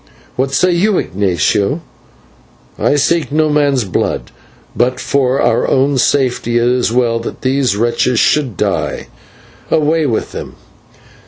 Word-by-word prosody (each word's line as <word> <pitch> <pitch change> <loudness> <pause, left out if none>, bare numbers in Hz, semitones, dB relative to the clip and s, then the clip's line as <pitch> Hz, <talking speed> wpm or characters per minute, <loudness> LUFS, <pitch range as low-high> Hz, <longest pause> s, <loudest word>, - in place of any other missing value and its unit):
"What 130 +1 -1
say 180 +7 +2
you, 185 +3 +2
Ignatio?" 100 - 0 1.0
"I - - +2
seek 150 0 +1
no 155 0 +1
man's 145 -4 +2
blood, 95 - -2 0.4
but 125 +1 0
for 135 -1 0
our - - +1
own 135 0 +2
safety 125 -3 +1
it 120 - +2
is 125 -2 +1
well 120 -1 +1
that 115 - -7
these 130 -4 +1
wretches 120 +1 +1
should 130 -10 +1
die. - - -2 0.6
Away 155 0 +1
with 115 - -2
them!" - - -8
130 Hz, 135 wpm, -15 LUFS, 120-145 Hz, 1.0 s, say